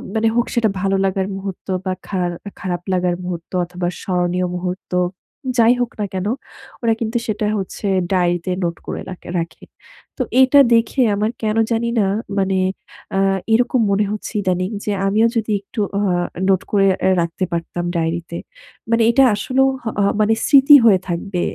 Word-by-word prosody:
মানে 220 +1 +2
হোক 240 0 +2
সেটা 230 -2 +2
ভালো 195 0 +1
লাগার 190 0 0
মুহূর্ত 195 -1 -7 0.2
বা 185 - 0
খার 180 -3 -1 0.3
খারাপ 175 -2 -3
লাগার 180 -1 +1
মুহূর্ত 175 -2 -6
অথবা 175 0 -4
স্মরণীয় 180 0 0
মুহূর্ত, 180 +1 -5 0.7
যাই 230 +1 +6
হোক 240 - -1
না 210 - 0
কেন, 190 +1 -2 0.5
ওরা 230 -1 +2
কিন্তু 230 +1 -1
সেটা 215 -1 -1
হচ্ছে 195 +2 -5 0.3
ডায়েরিতে 175 -1 +1
নোট 170 -1 -1
করে - - -4
রাকে 180 -1 -9
রাখে। 165 -1 -6 0.5
তো - - -2 0.2
এইটা 265 +2 +6
দেখে 230 +3 +2
আমার 215 +3 0
কেন 215 +1 0
জানি 230 +1 +1
না 200 - +3 0.3
মানে 190 -1 +1 0.6
আ - - +2 0.3
এরকম 245 +2 +3
মনে 205 +1 +2
হচ্ছে 210 +2 -5
ইদানিং 185 -1 0 0.2
যে, 210 - 0 0.2
আমিও 220 +3 +3
যদি 220 -1 -1
একটু 210 +3 -9 0.2
অ - - +1 0.5
নোট 190 -2 +3
করে 200 -2 +3 0.2
অ্যা 190 - +3
রাখতে 170 +2 -3
পারতাম 170 +1 -3
ডায়েরিতে। 170 +1 -2 0.5
মানে 230 0 +4
এটা 270 +3 +5
আসলেও 260 +6 +1 0.2
হহ 225 - -2 0.3
মানে 215 +1 +3
স্মৃতি 280 +1 +7
হয়ে 200 -5 +6
থাকবে। 175 +1 -3
195 Hz, 165 wpm, -19 LUFS, 180-225 Hz, 0.7 s, স্মৃতি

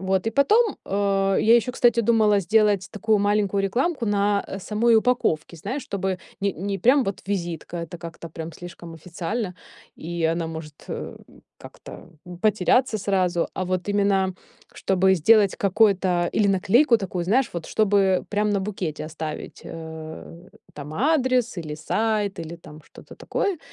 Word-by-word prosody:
Вот, 190 +1 0
и - - +1
потом, 420 - +3
э, 195 -1 +1
я 225 +2 +5
ещё, 240 +1 +2
кстати, 240 -2 +3
думала 215 -3 +3
сделать 205 0 +2
такую 215 0 +1
маленькую 205 -1 +1
рекламку 245 - 0
на 205 0 +1
самой 220 +4 +2
упаковке, 215 -9 0
знаешь, 260 - -4
чтобы 190 -2 -3 0.2
не 200 -1 0
не 195 +3 -4
прям 260 +2 +4
вот 195 - -4
визитка, 175 -3 -4
это 170 +1 -6
как-то 165 0 -9
прям 160 +1 -7
слишком 170 0 -10
официально, 180 +4 -4 0.4
и 170 0 -4
она 165 +1 0
может, 160 -2 -8
э, - - -6 0.4
как-то - - -12 0.3
потеряться 215 +3 +2
сразу. 185 -3 0
А 185 - -2
вот 185 +1 -2
именно, 200 -2 +1 0.4
чтобы 190 0 +2
сделать 200 +3 +4
какой-то 190 -4 +2
или 210 - +2
наклейку 230 +7 +4
такую, 180 -3 -4
знаешь, 245 +8 +2
вот 170 - -4
чтобы 195 -3 +2
прям 210 0 0
на 200 - +1
букете 180 -7 -4
оставить, 155 -1 -7
э, 160 +2 -9 0.3
там 145 +1 -8
адрес, 255 - +1
или 155 -3 -5
сайт, 210 +3 -1
или 165 +1 -7
там 155 -2 -14
что-то - - -15
такое. 390 -5 -2
195 Hz, 150 wpm, -24 LUFS, 170-215 Hz, 0.4 s, я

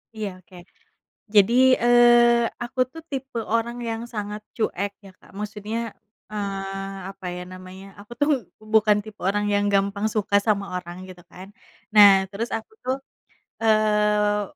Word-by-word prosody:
Iya 215 -2 -3
oke. 185 +1 -19 0.8
Jadi, 210 +2 +5 0.3
eee, 240 0 +5 0.2
aku 240 +2 -8
tuh 325 - -10
tipe 270 -4 -4
orang 235 +1 0
yang 225 0 -3
sangat 210 0 -5 0.2
cuek 200 -3 -1
ya 195 - -12
Kak, - - -20
maksudnya, 210 +1 -5 0.5
eee, 195 -1 -5
apa 195 -1 -11
ya 180 0 -6
namanya, 185 +1 -11
aku 205 +3 -15
tuh 290 - +2 0.3
bukan 215 -1 +3
tipe 215 -1 -11
orang 205 +2 0
yang 205 0 +2
gampang 200 +1 +1
suka 205 -2 -1
sama 200 -2 +1
orang, 180 +1 -8
gitu 180 -1 -12
kan. 185 +1 -11 0.5
Nah, 205 -1 +10 0.2
terus 220 +4 -4
aku, 225 - -5 0.9
eee, 210 -1 +2
210 Hz, 140 wpm, -23 LUFS, 195-225 Hz, 0.9 s, Nah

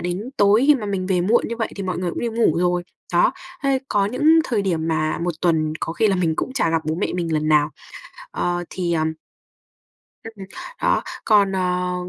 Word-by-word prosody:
đến 180 +8 -4
tối 205 +5 +4
khi 295 - +7
mà 220 -6 -3
mình 190 -2 -2
về 185 -2 +1
muộn 215 +7 +2
như 235 - -4
vậy 225 - -2
thì 200 - -4
mọi 185 -2 -3
người 180 -1 -1
cũng - - -5
đi 235 - -1
ngủ 225 -8 +1
rồi. 180 0 +1 0.3
Đó, 175 - +4 0.3
thế 275 -1 +2
có 200 -1 +2
những 300 +8 +4
thời 220 -5 0
điểm 165 -4 -1
mà 155 -1 0
một 175 -1 -2
tuần 160 -3 +1
có 165 - -3
khi 220 - +2
là 195 - +2
mình 165 -3 +1
cũng 260 - -3
chả 245 -11 +1
gặp 165 -1 0
bố 155 - -1
mẹ 180 - -1
mình 170 -2 -2
lần 155 0 0
nào. 150 0 +3 0.6
Ờ, 175 0 -2
thì, 175 -2 -2
ờm 160 -1 0 1.1
Ừm, 215 -4 -9 0.4
đó, - - +2 0.2
còn, 200 -3 +4
ờ, 180 -1 -1
180 Hz, 220 wpm, -21 LUFS, 165-210 Hz, 1.1 s, khi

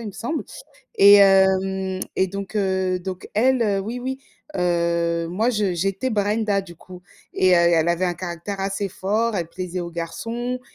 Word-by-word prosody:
il 230 - -7
me 205 - -6
semble 275 - -4 0.5
et 200 +1 +8
hem, 190 -1 +3 0.2
et 190 - +2
donc, 200 +1 -7
heu, 190 -2 0
donc 185 0 -7
elle, 250 +3 +2
heu, 200 -3 +1
oui 230 +5 -5
oui 265 +1 -4 0.4
heu, 170 -1 0
moi 220 +7 0
je 210 -6 0
j'étais 195 +8 -1
Brenda 210 -1 0
du 175 -2 -13
coup 180 +2 -13 0.3
et 185 0 +3
heu, - - +5
elle 170 -1 +3
avait 175 +2 +1
un 175 - 0
caractère 175 +3 -6
assez 195 +1 -2
fort, 215 +5 -1
elle 170 -3 -2
plaisait 180 +1 -5
aux 170 0 -4
garçons 230 +9 -4
190 Hz, 180 wpm, -22 LUFS, 175-210 Hz, 0.5 s, et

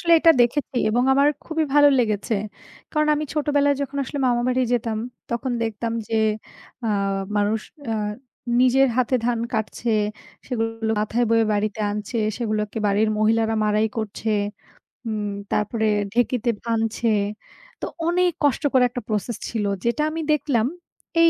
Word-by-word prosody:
আসলে 335 -1 +2
এটা 330 +1 +6
দেখেছি 250 +2 +1
এবং 240 +3 +2
আমার 280 +2 +4 0.2
খুবই 320 -1 0
ভালো 290 0 +7
লেগেছে। 215 -1 0 0.6
কারণ 305 -1 +2
আমি 305 +1 -2
ছোটবেলায় 285 -1 +2
যখন 280 0 -5
আসলে 285 - -5
মামা 240 -1 +2
বাড়ি 255 0 +2
যেতাম, 225 -2 0 0.3
তখন 245 +2 -1
দেখতাম 225 +1 -2 0.2
যে, 225 - -2 0.7
আ - - 0 0.5
মানুষ 210 +2 +1 0.3
আ - - +1 0.7
নিজের 260 +1 +5
হাতে 255 0 +2
ধান 240 -1 +1
কাটছে, 220 +1 -2 0.6
সেগুলো 225 -2 -2
মাথায় 225 +3 +1
বয়ে 225 -1 +4
বাড়িতে 210 +1 -1
আনছে, 210 +3 -4 0.2
সেগুলোকে 215 -2 -2
বাড়ির 205 +2 +2
মহিলারা 225 +1 +2
মাড়াই 210 +1 +2
করছে। 220 0 -3 0.8
উম 210 -2 -2 0.2
তারপরে 220 +1 0 0.3
ঢেঁকিতে 245 0 +1
ভানছে। 225 0 -1 0.7
তো - - -1 0.2
অনেক 360 +1 +3
কষ্টকর 280 -2 +3
একটা 245 0 -5
প্রসেস 215 +1 -2
ছিল। 220 -3 -2 0.2
যেটা 235 +6 +1
আমি 325 +1 -3
দেখলাম, 275 -7 +2 0.6
এই 335 - +7
235 Hz, 140 wpm, -23 LUFS, 220-270 Hz, 0.8 s, ভালো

